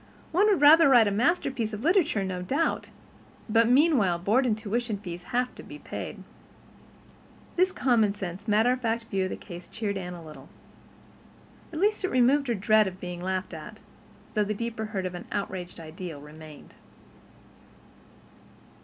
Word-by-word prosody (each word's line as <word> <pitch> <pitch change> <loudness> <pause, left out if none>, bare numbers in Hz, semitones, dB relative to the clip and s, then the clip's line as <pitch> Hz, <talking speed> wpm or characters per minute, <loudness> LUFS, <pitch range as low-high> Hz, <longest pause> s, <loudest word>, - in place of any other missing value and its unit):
One 385 +6 +4
would 400 -8 +3
rather 300 +1 +8
write 225 -6 +5
masterpieces 240 - 0
of 210 - -8
literature 320 - +2
no 185 -1 -3
doubt—but 230 - -2
meanwhile 250 - +4
board 220 +9 +2
and 215 -3 +1
tuition 225 0 -2
fees 175 -3 -7
have 250 +1 -1
to - - -11
be - - -10
paid." - - -7 1.3
This 370 +1 +3
commonsense, 205 - 0
matter 220 +3 +3
of 255 0 -1
fact 230 -1 -1
view 190 -1 +1
of - - -3
the - - -4
case 175 -2 -10
cheered 210 -3 -3
Anne 180 -1 -6
a 170 -2 -11
little. 155 -1 -12 1.2
At 315 - -6
least 420 +2 +1
it 375 - 0
removed 265 +3 +3
her 235 - +1
dread 215 +1 +3
of 185 0 -7
being 180 -1 -6
laughed 185 0 -3
at, 165 +7 -9 0.6
though 210 - +2
the 210 +1 -2
deeper 230 0 -4
hurt 200 -3 -4
of 180 - -3
an 175 - -8
outraged 185 -3 -4
ideal 165 -1 -8
remained. 150 +1 -13
215 Hz, 160 wpm, -27 LUFS, 185-250 Hz, 1.3 s, rather